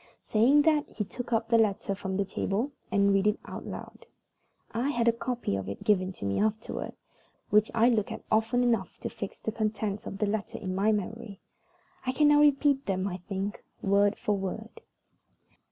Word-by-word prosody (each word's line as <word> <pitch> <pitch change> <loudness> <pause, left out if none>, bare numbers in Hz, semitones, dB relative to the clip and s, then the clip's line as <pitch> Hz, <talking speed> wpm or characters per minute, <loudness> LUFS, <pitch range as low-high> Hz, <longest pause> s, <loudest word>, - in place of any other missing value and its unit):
Saying 260 +7 +4
that, 305 -2 +2
he 210 - -3
took 245 +5 -7
up 225 0 0
a - - +8
letter 210 -2 +1
from 190 -1 -4
the 200 - +1
table 205 +7 -2 0.2
and 200 0 +4
read 195 +1 +3
it 210 - +1
aloud. - - -8 0.6
I 240 +5 0
had 235 -4 +1
a - - +7
copy 240 - -2
of 95 0 -4
it 100 - -6
given 190 -3 +2
to 100 - -7
me 100 0 0
afterward, 220 +1 -2 0.6
which 210 +1 +4
I 230 +1 +5
looked 225 -4 +1
at - - -6
often 225 +3 +2
enough 230 -6 0
to - - -3
fix 200 - -7
the 220 - -3
contents 215 -1 -2
of 195 - -5
the 210 - +1
letter 210 0 -2
in 185 -2 -4
my 200 +3 +2
memory. 210 0 -4 0.6
I 255 - -1
can 295 +2 +4
now 295 0 +6
repeat 285 -1 +3
them, 190 0 0
I 180 -2 -3
think, 195 +2 -5 0.2
word 200 +1 +3
for 210 - 0
word. 200 +4 -5
215 Hz, 190 wpm, -29 LUFS, 195-235 Hz, 0.6 s, a